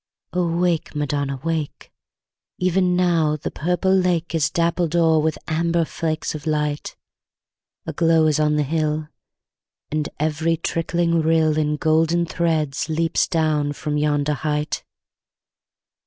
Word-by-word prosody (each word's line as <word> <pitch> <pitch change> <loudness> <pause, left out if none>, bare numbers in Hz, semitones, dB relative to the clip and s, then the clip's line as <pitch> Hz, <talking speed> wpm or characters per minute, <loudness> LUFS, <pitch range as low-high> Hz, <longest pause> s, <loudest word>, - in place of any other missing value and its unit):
O 180 -1 +1
wake, 175 -3 0
Madonna! 145 -2 -2
wake; 160 -3 -3 0.7
Even 180 0 +2
now 170 -4 +2
the - - -5
purple 180 +3 0
lake 180 -3 +1
Is 155 -2 +2
dappled 170 -1 0
o'er 165 -2 +4
with 155 0 0
amber 165 +1 +1
flakes 160 -1 -3
of 155 0 -7
light; 150 -1 -1 0.9
A - - -4
glow 165 -1 +3
is 155 -1 +2
on 150 0 +2
the 150 - +2
hill; 155 +1 -1 0.8
And 150 0 -1
every 160 +2 0
trickling 170 +1 0
rill 160 -1 +2
In 150 -1 0
golden 160 +2 +2
threads 160 -4 -1
leaps 165 +1 +1
down 155 -3 0
from 150 +1 -3
yonder 150 0 +1
height. 150 +1 -2
160 Hz, 130 wpm, -22 LUFS, 150-170 Hz, 0.9 s, o'er